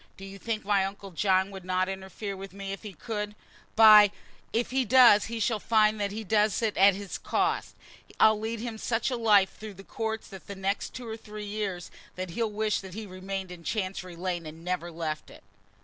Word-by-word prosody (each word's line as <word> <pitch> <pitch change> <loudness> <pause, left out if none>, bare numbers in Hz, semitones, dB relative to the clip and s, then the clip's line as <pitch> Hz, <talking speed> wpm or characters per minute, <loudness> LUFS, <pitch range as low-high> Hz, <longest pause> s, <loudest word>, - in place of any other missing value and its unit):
Do 195 - -9
you 195 0 -10
think 220 0 -3
my 200 -1 +3
uncle 195 0 -6
John 190 +2 +2
would 190 -2 -9
not 185 0 0
interfere 195 +1 -5
with 195 0 -9
me 195 0 -6
if 195 - -8
he 210 -3 -8
could? 210 +4 -5 0.4
By! 215 -2 +9 0.4
if 235 +2 -1
he 265 0 +2
does, 240 -3 +7
he 230 0 -5
shall 220 0 +1
find 215 -1 +3
that 200 -1 -1
he 220 +2 -5
does 210 +1 +2
it 220 -2 +1
to - - -1
his 200 0 -6
cost. - - -1 0.4
I'll 215 -1 +6
lead 225 +1 -3
him 230 -2 -5
such 225 +3 -1
a - - 0
life 210 -5 +4
through 215 -2 -9
the 195 - -12
courts, 220 +1 -4
for 195 - -9
the 200 +4 -9
next 195 +1 -2
two 245 -2 -7
or 220 0 -5
three 210 -1 -8
years, 200 -4 -4 0.2
that 185 -1 -5
he'll 225 +5 -1
wish 210 0 0
that 190 -1 -10
he 220 - -5
had 205 -4 -10
remained 190 0 -5
in 175 -1 -10
Chancery 185 -3 -3
Lane, 175 -2 -3
and 155 +1 -9
had 165 - -15
never 180 -1 -2
left 160 -2 -4
it." - - -15
200 Hz, 225 wpm, -28 LUFS, 190-220 Hz, 0.4 s, By